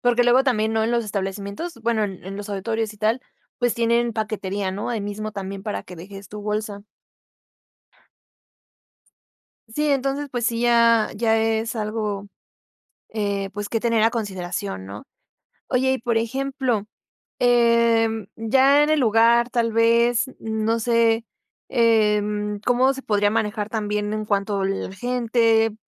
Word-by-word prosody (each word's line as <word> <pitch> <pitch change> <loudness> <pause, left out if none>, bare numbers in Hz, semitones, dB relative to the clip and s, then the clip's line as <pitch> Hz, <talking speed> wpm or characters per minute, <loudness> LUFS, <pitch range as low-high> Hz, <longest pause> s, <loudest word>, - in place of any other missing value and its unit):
porque 245 0 +3
luego 250 +2 +5
también 220 -4 +1
¿no?, 220 0 +1
en 225 - 0
los 235 -1 +1
establecimientos, 200 - -4
bueno, 225 -2 +1
en 195 0 -7
los 205 +1 -7
auditorios 220 +2 -2
y - - -18
tal, 220 +4 0 0.4
pues 245 -1 +1
tienen 235 0 +1
paquetería, 205 -3 -2
no 200 +5 -4
ahí 230 -3 -2
mismo 215 +1 -5
también 195 -1 -6
para 210 -1 -4
que 180 - -12
dejes 195 +3 -10
tu 210 0 -8
bolsa. 210 -1 -3 2.9
Sí. 300 0 0
Entonces 275 +1 0
pues 245 -1 -1
sí, 230 -1 -1
ya 235 -2 +4
ya 225 +1 +2
es 225 +1 0
algo, 210 -2 -3 0.8
eh, 200 -2 -2
pues, 205 0 -5
que 225 - 0
tener 230 -2 +2
a 225 - +5
consideración, 175 - -4
¿no? 100 +2 -9 0.6
Oye, 260 +1 +2
y 265 - 0
por 230 -1 0
ejemplo, 260 -1 -1 0.6
em, 235 -3 +3
ya 265 +6 +4
en 300 - +2
el 310 - +3
lugar, 235 +1 +4
tal 230 -2 0
vez 235 +2 +3
no 220 +1 -1
sé, 230 0 +2 0.4
em, 210 -2 +1
cómo 255 +2 +3
se 270 - -7
podría 205 -1 +2
manejar 210 -1 -1
también 210 -1 -2
en 215 0 -2
cuanto 200 -1 0
la 195 0 -2
gente, 230 -1 +1
225 Hz, 145 wpm, -23 LUFS, 205-235 Hz, 2.9 s, luego